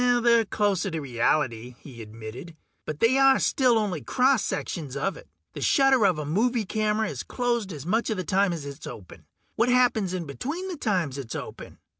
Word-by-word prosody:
"They're 240 -2 +4
closer 200 -2 0
to 165 -2 -3
reality," 125 -2 -1
he 120 -5 -11
admitted. 110 +9 -9 0.3
"But 155 -1 -5
they 260 +4 +4
are 270 0 +6
still 250 -4 +3
only 195 -8 -1
cross 260 -2 +2
sections 145 -6 -4
of 190 +8 -1
it. - - -13 0.3
The - - -7
shutter 265 -6 +4
of 180 -4 +1
a 150 - -4
movie 220 - +1
camera 215 +1 0
is - - -5
closed 235 -5 -2
as 145 -4 -8
much 220 +6 0
of 220 - -1
the 185 - -2
time 195 +1 +2
as 165 -4 -5
it - - -5
is - - -9
open. 95 -5 -11 0.3
What 230 +2 +2
happens 240 -7 +2
in 175 -2 -4
between 290 - -5
the 355 - -5
times 180 - -1
it's 120 -4 -6
open? - - -8
195 Hz, 200 wpm, -26 LUFS, 150-240 Hz, 0.3 s, are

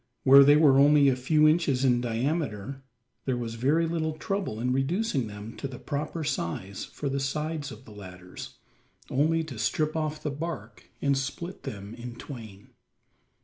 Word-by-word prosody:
Where 140 +1 +9
they 145 +1 +7
were 145 -3 +6
only 145 0 +6
a 130 - +2
few 150 +4 +3
inches 150 -5 +2
in 120 -2 +3
diameter, 125 0 -2 0.4
there 130 -2 0
was 115 -2 -4
very 140 +8 +2
little 160 -1 -1
trouble 170 - -3
in 125 +2 0
reducing 135 - 0
them 105 +2 -8
to 140 - -4
the 130 -2 -8
proper 150 +4 -4
size 95 - -3
for 145 - -6
the 135 0 -1
sides 150 +1 -2
of 115 +3 -11
the - - -13
ladders 90 -3 -10 0.5
only 160 +4 +2
to 135 -8 -8
strip 150 +9 0
off 155 -1 -2
the 150 - -1
bark 160 +4 -6
and 140 -1 +3
split 145 +7 -4
them 100 +1 -6
in 120 0 -8
twain. 110 -6 -10
135 Hz, 170 wpm, -27 LUFS, 115-155 Hz, 0.5 s, Where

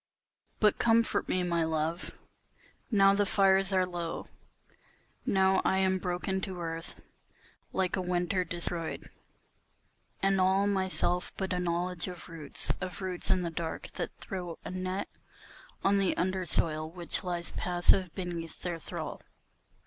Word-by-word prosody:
But 210 -2 +4
comfort 225 -3 +3
me, 185 - +1
my 170 -2 +2
love, 160 +2 -2 0.7
now 195 -4 +6
the 205 +1 +3
fires 195 0 +4
are 185 -1 +3
low, 175 -2 -4 1.0
Now 190 0 +4
I 190 - +3
am 190 0 +3
broken 185 +1 -1
to 190 -2 -4
earth 165 0 -4 0.7
like 185 -2 +1
a 190 - -1
winter 180 +1 +1
destroyed, 170 -2 -2 1.1
and 195 -1 +3
all 190 +2 +4
Myself 190 -2 +1
but 190 -1 -1
a 180 - 0
knowledge 175 0 0
of 180 -1 -8
roots, 160 -4 -3
of 185 -1 -4
roots 180 -2 -2
in 185 - +3
the 170 - -2
dark 165 0 -4
that - - -3
throw 180 -4 -5
A - - -4
net 185 +1 -2 0.8
on 200 0 +4
the 195 -2 +2
undersoil, 170 -4 +1
which 175 0 -2
lies 175 -2 -2
passive 180 0 +3
beneath 170 -3 -4
their 175 -2 -2
thrall. - - -5
180 Hz, 140 wpm, -30 LUFS, 170-190 Hz, 1.1 s, now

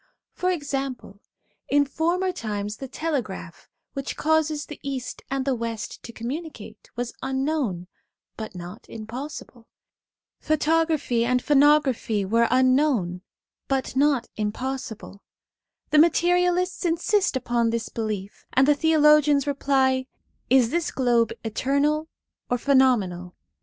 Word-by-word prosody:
For 365 - -1
example, 275 - -4 0.5
in 285 0 +4
former 340 +6 0
times 210 - -4
the 270 - -7
telegraph, 250 - -4 0.2
which 275 -1 -5
causes 310 -1 +1
the 300 - -10
East 260 -2 -5
and 270 -1 -1
the 275 - +1
West 230 -3 -5
to 235 - -9
communicate, 235 -3 -7
was 240 0 -3
unknown, 265 - -1 0.5
but 220 -3 -7
not 180 +5 -9
impossible; 235 +1 -8 0.7
photography 310 -5 +1
and 250 +1 +2
phonography 280 -8 +3
were 230 +3 +3
unknown 255 - +2 0.5
but 265 -1 -1
not 275 -3 +2
impossible/ 220 -1 -4 0.7
The 305 - +6
materialists 355 +2 +3
insist 360 +2 +1
upon 240 -2 +1
this 230 0 -2
belief, 215 -3 -5
and 265 +1 +4
the 295 - +6
theologians 300 -2 +4
reply: 265 -2 +1 0.4
'Is 255 -3 +4
this 340 0 0
globe 240 -4 +2
eternal 280 +7 0 0.4
or 245 - +1
phenomenal? 230 -10 +2
265 Hz, 115 wpm, -24 LUFS, 230-300 Hz, 0.7 s, The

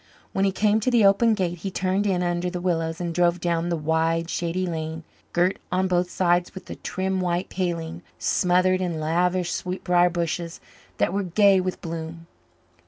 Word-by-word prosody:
When 195 - +2
he 195 - +2
came 210 +2 +2
to 220 - 0
the 235 -4 +4
open 220 +3 +4
gate 175 -3 -2
he 195 - -4
turned 190 +2 0
in 180 -2 +1
under 175 0 -1
the 180 0 -4
willows 165 -2 -1
and 170 -1 -3
drove 175 0 +2
down 170 0 0
the 170 - 0
wide, 160 +2 0
shady 175 +2 -1
lane, 160 -1 -4 0.3
girt 180 +2 +1
on 185 +1 +1
both 180 -1 +1
sides 175 0 +1
with 190 - -9
a - - -5
trim 190 0 -2
white 175 0 -1
paling 170 -2 -3 0.2
smothered 185 +1 +2
in 170 -3 -2
lavish 175 +3 +1
sweetbriar 180 -1 +1
bushes 170 0 -3 0.4
that 170 - +1
were 200 - 0
gay 195 +1 +4
with 185 0 -4
bloom. 165 0 -6
175 Hz, 180 wpm, -24 LUFS, 170-185 Hz, 0.4 s, the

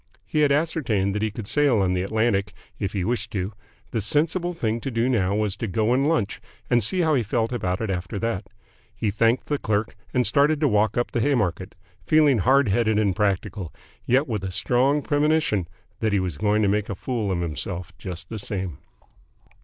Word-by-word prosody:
He 155 - -1
had 145 -1 +4
ascertained 140 -11 +1
that 105 - -2
he 110 - +1
could 105 0 -7
sail 140 -1 +3
on 95 -2 +2
the 90 - 0
Atlantic 110 0 0 0.3
if 100 - -2
he 95 -3 -1
wished 120 +1 -1
to. 95 +1 -2 0.4
The 115 - -1
sensible 165 - +1
thing 115 -9 -2
to 135 - -3
do 115 0 0
now 100 -6 +1
was 105 -2 0
to 115 - -3
go 110 +5 +1
and 135 +3 +2
lunch 120 -12 0 0.3
and 120 -2 +4
see 180 - 0
how 160 -2 +2
he 135 - +3
felt 115 +1 -1
about 95 -6 -2
it 110 -3 -1
after 90 +2 -3
that. 105 -3 -2 0.5
He 105 - -1
thanked 115 +4 +2
the 145 -1 -1
clerk, 105 0 -1 0.2
and 125 -1 +1
started 145 +2 +3
to 150 - +4
walk 105 -2 +2
up 120 - 0
the 120 - 0
Haymarket, 100 - 0 0.3
feeling 145 - +4
hard 135 +5 +4
headed 110 +1 +2
and 100 -4 +2
practical, 100 -3 -1 0.4
yet 135 +5 +3
with 105 -5 -3
a 95 - -2
strong 130 +9 +1
premonition 145 - +1 0.3
that 110 -2 0
he 100 - +3
was 90 -6 -3
going 105 0 +2
to - - +3
make 105 +1 0
a 100 - -3
fool 110 -1 -2
of 90 -2 -1
himself 85 +3 -4
just 90 -3 -6
the 110 - -5
same. 95 -6 -4
110 Hz, 210 wpm, -24 LUFS, 95-130 Hz, 0.5 s, had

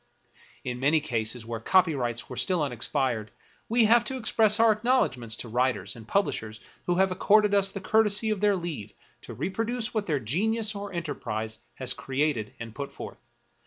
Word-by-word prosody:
In 125 -1 -4
many 145 +4 +3
cases 115 -4 -2
where 115 0 -4
copyrights 130 - +2
were - - -7
still 180 -5 +1
unexpired, 125 -4 -1 0.4
we 230 0 +4
have 235 +2 +5
to 265 - -4
express 220 -3 +3
our 225 -1 +6
acknowledgments 210 - +1
to - - -6
writers 125 +3 0
and 115 -2 -12
pub 200 +8 +3
lishers 110 -6 -5 0.3
who 175 - +2
have 190 +1 +3
accorded 210 +3 +4
us 200 -1 +3
the 195 0 -6
courtesy 215 +1 +2
of 205 -2 -2
their 205 -1 +4
leave 155 - -5 0.3
to - - -9
reproduce 225 - -2
what 215 -2 -1
their 150 -4 +1
genius 210 - 0
or 200 0 -6
enterprise 110 -10 -4 0.2
has 130 -1 -1
created 135 -5 -1
and 115 -1 -7
put 140 +2 -6
forth. - - -10
160 Hz, 175 wpm, -27 LUFS, -, 0.4 s, our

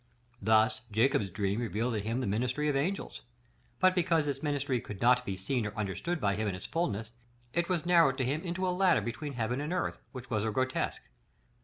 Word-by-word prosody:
Thus, 110 +4 +3
Jacob's 115 -1 +2
dream 100 +2 -1
revealed 115 +1 -1
to 110 - 0
him 115 +5 -2
the - - -1
ministry 125 +8 0
of 145 - +1
angels; 175 +9 -2 0.6
but 185 0 +5
because 170 -4 +2
this 140 -2 -2
ministry 140 -4 0
could 105 -2 -8
not 125 +1 +4
be 95 - -2
seen 115 +6 -1
or 105 0 -5
understood 110 - -2
by 100 -6 +1
him 110 +2 -1
in 95 - -1
its 90 - -8
fulness, 110 -10 -2 0.4
it 170 +1 0
was 175 -3 0
narrowed 165 -7 +5
to 130 - 0
him 145 +5 -1
into 185 +1 -2
a 180 - +1
ladder 185 -2 +4
between 140 +5 -4
heaven 120 +2 -1
and 150 +3 -3
earth, 180 0 -1
which 125 -2 -9
was 105 -2 +1
a 110 - 0
grotesque. 130 +4 -1
125 Hz, 210 wpm, -31 LUFS, 110-155 Hz, 0.6 s, but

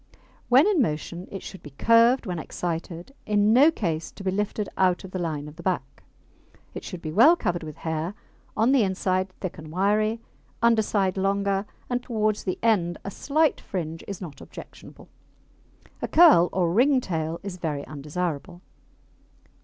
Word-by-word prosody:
When 260 +5 +6
in 400 -7 +3
motion 170 - -3
it 195 - -7
should 190 - -9
be 150 - -10
curved 230 +3 +4
when 180 -4 -3
excited, 170 - -5
in 210 +1 +3
no 275 +6 +7
case 165 - -3
to 200 - -10
be 190 - 0
lifted 205 +1 -2
out 185 -2 +2
of 190 - -10
the 185 - -4
line 155 -4 -3
of 150 +1 -12
the - - -9
back. 165 -7 -3 0.7
It - - -7
should 180 -2 -8
be 155 - -4
well 240 - +6
covered 175 - -2
with 155 -2 -8
hair, 160 +4 -2 0.4
on 225 +4 +3
the 275 -3 +4
inside 190 -1 0
thick 185 -4 -5
and 155 0 -10
wiry, 210 +5 +1 0.4
underside 215 -5 +2
longer, 195 +1 0 0.2
and 245 0 -1
towards 215 -3 -1
the 185 - -2
end 175 -7 +2
a 200 - -4
slight 305 +8 +1
fringe 165 -3 -5
is 200 -3 -6
not 165 -6 -9
objectionable. - - -12 0.9
A - - -2
curl 310 - +6
or 175 -3 0
ring 260 +6 +4
tail 165 -6 -3
is 195 -2 -6
very 150 -5 -3
undesirable. 160 +3 -5
190 Hz, 170 wpm, -25 LUFS, 170-215 Hz, 0.9 s, no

